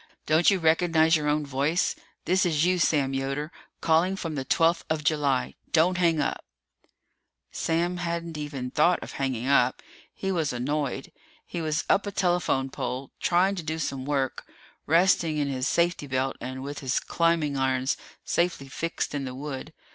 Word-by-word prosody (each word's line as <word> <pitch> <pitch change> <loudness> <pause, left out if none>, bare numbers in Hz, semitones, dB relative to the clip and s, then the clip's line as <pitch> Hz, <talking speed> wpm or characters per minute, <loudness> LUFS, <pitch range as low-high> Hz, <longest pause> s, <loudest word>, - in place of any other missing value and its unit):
Don't 160 +2 +4
you 200 - +3
recognize 160 -1 +3
your 150 -1 0
own 150 0 +1
voice? 140 +5 0 0.3
This 185 +1 +3
is 160 -3 +2
you, 180 0 +2
Sam 140 -5 +2
Yoder, 135 +3 -2 0.3
calling 165 +4 +3
from 165 -4 -4
the 135 -3 -3
twelfth 165 +5 +2
of 155 -1 -1
July. 145 -4 +1 0.2
Don't 180 +3 +3
hang 165 -3 +3
up!" 145 - -1 1.1
Sam 170 +2 0
hadn't 170 -1 -3
even 145 -4 -5
thought 170 +5 +4
of - - -8
hanging 130 -3 -2
up. 130 -2 +3 0.3
He 195 - -3
was 160 -5 0
annoyed. 135 +2 -2 0.3
He 170 - -5
was 155 0 -1
up 200 - +2
a - - -2
telephone 175 -8 +1
pole, 130 +1 -4
trying 185 +3 +3
to - - -2
do 160 0 -3
some 135 -4 -3
work, 135 -2 -2 0.4
resting 165 -1 +3
in 145 -1 0
his 130 -1 -1
safety 170 -3 +1
belt 130 0 -1
and 130 +1 -5
with 145 +1 -5
his 130 -1 0
climbing 165 -4 +1
irons 130 0 +1 0.3
safely 170 -6 0
fixed 165 +3 -3
in 140 -2 -2
the 130 -1 -6
wood. 140 +1 -6
155 Hz, 170 wpm, -26 LUFS, 135-170 Hz, 1.1 s, Don't